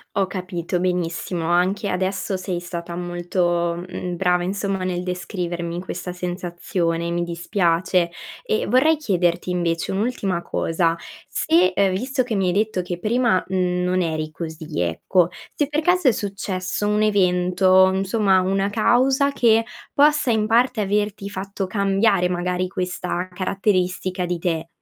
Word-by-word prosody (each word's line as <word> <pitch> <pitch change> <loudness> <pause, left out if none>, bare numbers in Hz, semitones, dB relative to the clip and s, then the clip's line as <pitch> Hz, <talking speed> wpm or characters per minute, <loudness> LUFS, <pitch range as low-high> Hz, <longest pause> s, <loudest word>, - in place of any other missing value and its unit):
Ho 195 -2 +2
capito, 180 -2 -3
benissimo. 175 -1 -2
Anche 190 +4 +1
adesso 190 +1 -1
sei 185 -1 -3
stata 170 -1 -6
molto, 175 -1 -1
mhmm, 180 -1 -4
brava 180 0 +1
insomma, 195 0 -2
nel 180 -1 -1
descrivermi 175 -1 -4
questa 180 -1 -5
sensazione, 175 -1 -2
mi 175 0 -1
dispiace. 170 0 +1 0.3
E, 455 0 0
vorrei 305 +5 +4
chiederti 180 - 0
invece, 170 -2 -1
un'ultima 195 -4 -1
cosa 165 0 0 0.3
se, 180 +3 +2
uhm, 200 -1 +3
visto 255 +7 -1
che 240 -3 -2
mi 195 -1 +1
hai 180 - +1
detto 205 -2 0
che 175 -1 -5
prima, 230 -2 +2
mhmm, 180 -1 0
non 180 +1 +1
eri 155 -2 -2
così 160 - -5
ecco, 165 - +1 0.3
se 290 - +1
per 295 +2 -1
caso 355 -2 +2
è - - +5
successo 200 -1 -3
un 210 0 +2
evento 185 -2 +4
insomma, 195 +1 +2
una 195 +2 0
causa, 260 +6 +3
che 230 -4 +4 0.3
possa 295 -2 +4
in 220 -2 +2
parte 235 +1 +2
averti 205 0 -1
fatto 195 0 -4
cambiare 195 -1 +2
magari 180 +1 -1
questa 180 -1 -3
caratteristica 185 -1 -1
di 175 0 -1
te. 165 -1 -2
185 Hz, 145 wpm, -22 LUFS, 175-205 Hz, 0.3 s, è